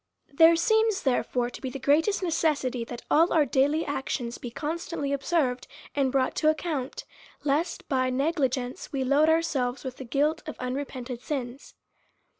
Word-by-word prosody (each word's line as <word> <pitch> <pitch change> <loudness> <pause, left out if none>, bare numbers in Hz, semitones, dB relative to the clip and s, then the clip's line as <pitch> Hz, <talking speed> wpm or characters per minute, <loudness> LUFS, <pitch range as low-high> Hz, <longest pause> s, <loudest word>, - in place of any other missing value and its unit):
There 325 +3 +7
seems, 440 +3 +2
therefore, 245 -2 0
to - - -10
be 265 - -3
the 255 - -6
greatest 320 +9 +2
necessity, 295 -7 0
that 240 0 -8
all 330 +3 +5
our 310 -3 +4
daily 290 +4 +2
actions 260 -4 -3
be 245 - -6
constantly 300 +1 -3
observed 275 -3 0 0.3
and 275 -2 +2
brought 260 -1 +1
to 310 - +4
account, 310 -4 -2 0.4
lest, 330 +5 -1
by 260 -3 +1
a - - -1
negligence, 265 -3 -1
we 270 -2 -1
load 285 +4 +4
ourselves 295 -6 0
with 260 -2 -6
the - - -7
guilt 295 +6 +1
of - - -5
unrepented 255 -1 -4
sins. 265 -2 -5
280 Hz, 160 wpm, -27 LUFS, 255-320 Hz, 0.4 s, There